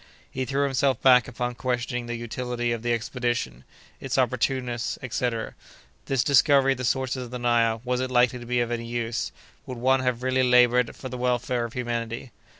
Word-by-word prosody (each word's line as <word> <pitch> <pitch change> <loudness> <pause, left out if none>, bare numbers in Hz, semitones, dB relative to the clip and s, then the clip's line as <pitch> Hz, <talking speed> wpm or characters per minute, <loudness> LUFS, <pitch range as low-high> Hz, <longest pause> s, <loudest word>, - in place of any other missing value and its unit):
He 130 0 -3
threw 140 +3 0
himself 135 -2 +1
back 125 -3 +6
upon 125 0 -3
questioning 120 -1 -2
the 120 - -3
utility 120 +1 -3
of 115 -1 -2
the 120 +1 -1
expedition—its 120 - -4
opportuneness, 125 -1 0
etc. 120 -2 -2 0.5
This 135 -2 +1
discovery 140 0 +4
of 135 - -2
the 130 - -2
sources 130 0 -1
of - - -11
the 125 - -5
Nile, 115 -2 +1
was 125 0 0
it 130 - -2
likely 125 0 +3
to 120 - -10
be 125 0 +1
of 120 0 -2
any 115 -1 -3
use?—Would 120 +1 -5
one 130 +2 +3
have 125 -1 -1
really 130 0 +2
labored 125 -1 +4
for 130 - -7
the 125 -1 -6
welfare 125 -1 0
of 115 - -8
humanity? 120 0 -4
125 Hz, 180 wpm, -25 LUFS, 120-130 Hz, 0.5 s, back